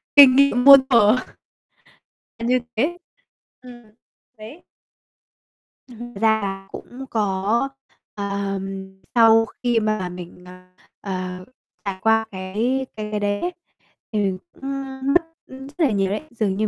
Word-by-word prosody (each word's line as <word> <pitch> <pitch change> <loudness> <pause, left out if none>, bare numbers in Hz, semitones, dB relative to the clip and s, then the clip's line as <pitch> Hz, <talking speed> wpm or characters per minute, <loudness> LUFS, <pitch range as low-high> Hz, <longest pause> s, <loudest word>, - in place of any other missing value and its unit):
Kinh 270 -3 +9
nghiệm 275 -3 +4
muôn 275 -1 +9
thuở. 225 -2 +5 1.2
À, 230 - -8
như 250 +1 +3 0.2
thế, 310 +10 0 0.6
ừm, 245 -1 -13 0.5
đấy. 225 +11 -12 1.3
Thật 245 - -13 0.3
ra 220 -1 +3
là 195 0 -5
cũng 265 +2 -9
có, 210 +4 0 0.5
ờm, 195 -1 -4 0.2
sau 225 -1 +6 0.2
khi 240 -2 +2
mà 215 -4 -1
mình, 180 0 -10
ờ, 180 0 -12 0.5
ờ, 185 -2 -5 0.4
trải 195 -1 -4
qua 225 0 +3
cái 215 +8 -2
cái 210 0 -5
cái 210 -1 -2
đấy 205 0 -1
ấy, 355 - -1 0.6
thì 215 - -1
mình 190 -2 0 0.2
cũng, - - -23
ưm, 270 0 -3
mất 350 - +5 0.3
rất 270 +5 -12
là 290 -8 +3
nhiều 195 -1 0
đấy, 210 - -2
dường 215 -5 -1
như 215 0 +1
220 Hz, 140 wpm, -22 LUFS, 195-255 Hz, 1.3 s, Kinh